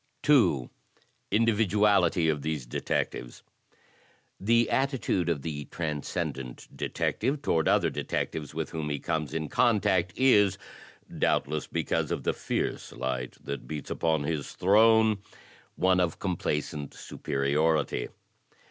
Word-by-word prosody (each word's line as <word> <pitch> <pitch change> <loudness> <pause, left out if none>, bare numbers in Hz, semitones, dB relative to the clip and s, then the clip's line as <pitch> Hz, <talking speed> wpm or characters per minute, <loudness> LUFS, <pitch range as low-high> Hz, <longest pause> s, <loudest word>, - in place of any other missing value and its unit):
2. 115 - +4 0.6
Individuality 105 -4 +3
of 75 -2 +1
these 75 -3 -3
Detectives - - -3 1.0
The 115 +3 +3
attitude 130 - 0
of 75 -5 -1
the 75 -3 -4
Transcendent 70 -5 -4
Detective 140 +5 -1
toward 80 - +1
other - - +3
detectives 75 -3 -3
with - - -4
whom 80 -2 -3
he 75 - -1
comes 80 0 -2
in 80 -1 -2
contact, 95 -5 +2
is 105 -7 +4 0.3
— - - -15
doubtless 75 -1 +1
because - - -1
of - - -2
the - - +1
fierce - - -3
light 65 -1 -3
that 70 0 -5
beats 75 -2 -6
upon 80 -3 +1
his 75 -1 -3
throne 110 +2 +4 0.3
— - - -27
one 95 0 +3
of 90 -3 0
complacent 75 -5 -3
superiority. 70 0 0
80 Hz, 120 wpm, -28 LUFS, 75-105 Hz, 1.0 s, 2